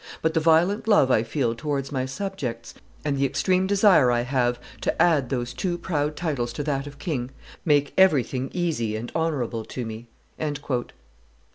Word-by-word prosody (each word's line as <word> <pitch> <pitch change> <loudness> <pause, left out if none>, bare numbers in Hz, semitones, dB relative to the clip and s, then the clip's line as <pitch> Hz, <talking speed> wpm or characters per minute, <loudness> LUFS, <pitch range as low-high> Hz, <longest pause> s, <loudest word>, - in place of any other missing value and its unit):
But 160 0 +2
the - - +3
violent 170 +7 +3
love 205 -12 +5
I 110 - +4
feel 115 0 -1
towards 140 +3 -3
my 130 -2 -1
subjects, 135 -7 -5 0.3
and 145 -2 +1
the 140 - +3
extreme 185 +7 +1
desire 195 - +5
I 120 -1 +2
have 120 -1 0 0.2
to - - -1
add 150 -8 +3
those 125 -2 -2
two 175 -2 -2
proud 150 -4 -2
titles 140 -9 -2
to 145 - -3
that 140 -1 -2
of 140 0 -10
king, 135 -7 -3 0.4
make 145 -3 +2
everything 135 -7 +3
easy 150 -12 -1
and 115 +2 -5
honorable 135 -9 -1
to 125 - -5
me." 110 +1 -7
140 Hz, 165 wpm, -25 LUFS, 120-165 Hz, 0.4 s, love